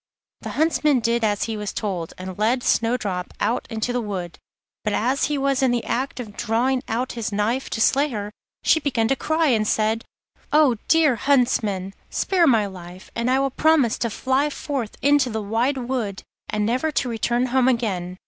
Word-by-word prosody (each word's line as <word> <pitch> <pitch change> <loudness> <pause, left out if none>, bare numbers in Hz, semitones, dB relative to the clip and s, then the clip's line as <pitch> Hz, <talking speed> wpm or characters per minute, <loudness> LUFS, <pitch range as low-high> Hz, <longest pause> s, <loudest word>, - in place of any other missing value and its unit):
The - - -7
Huntsman 305 -3 +3
did 235 0 0
as 205 -2 +1
he 225 - -3
was 210 -1 -4
told 180 -6 -3
and 185 0 -7
led 240 +4 +1
Snowdrop 220 -8 0
out 235 - 0
into 225 +2 -2
the 245 - 0
wood, 185 -6 -5 0.4
but 210 - -1
as 255 +7 +1
he 295 0 -1
was 275 -1 +1
in 265 - +3
the 240 -1 0
act 260 +2 -2
of 215 -4 -7
drawing 250 +5 0
out 245 +3 -2
his 230 -1 -4
knife 220 +6 -1
to - - -3
slay 280 +6 +3
her, 210 -4 -5 0.3
she 320 - +4
began 240 -7 0
to 270 - +3
cry, 315 +4 +1
and 215 -4 +2
said: 220 +1 +1 0.5
'Oh, 295 -6 +4
dear 310 -7 +4
Huntsman, 215 -8 +1 0.2
spare 360 -4 +2
my 225 -6 +4
life, 185 -1 -10
and 235 +1 -1
I 260 - +3
will 275 0 +1
promise 300 -6 +3
to 235 - 0
fly 265 +6 0
forth 275 -6 -4
into 285 -2 +4
the 220 -1 -3
wide 230 +6 0
wood 240 -6 -3 0.3
and 210 0 0
never 255 +8 0
to 255 - 0
return 240 +1 0
home 260 -1 +4
again. 190 -8 -1
235 Hz, 190 wpm, -23 LUFS, 210-265 Hz, 0.5 s, she